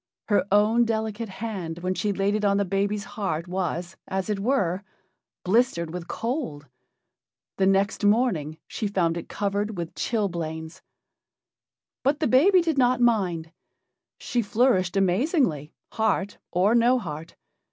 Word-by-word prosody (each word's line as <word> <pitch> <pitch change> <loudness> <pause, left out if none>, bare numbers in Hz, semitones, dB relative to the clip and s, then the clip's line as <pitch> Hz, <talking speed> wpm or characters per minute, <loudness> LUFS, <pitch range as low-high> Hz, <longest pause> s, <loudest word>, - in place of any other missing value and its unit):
Her 200 -3 +2
own 215 +4 +4
delicate 220 -1 -2
hand 190 -5 -5
when 185 0 0
she 205 +2 -1
laid 195 +1 0
it 210 0 -1
on 200 -1 +3
the 200 - +1
baby's 200 +2 -1
heart 190 -7 -3
was, 180 -1 -3
as 190 +2 -2
it 205 - -1
were, 195 -5 0 0.6
blistered 185 -5 +1
with 180 -1 -6
cold. 225 - -3 0.9
The 190 - +4
next 195 +2 +1
morning 205 - +2
she 215 - -3
found 175 -5 +1
it 170 - -6
covered 205 0 -2
with 170 -1 -4
chilblains. 165 -7 -3 1.2
But 280 +3 +1
the 315 - +1
baby 355 +9 +5
did 325 -4 0
not 250 -1 +3
mind. 185 -9 +1 0.7
She 245 - -1
flourished 205 -5 +2
amazingly, 195 - +1 0.2
heart 205 -3 0
or 190 +5 +2
no 240 +2 +4
heart. 165 -6 -7
200 Hz, 140 wpm, -25 LUFS, 175-230 Hz, 1.2 s, baby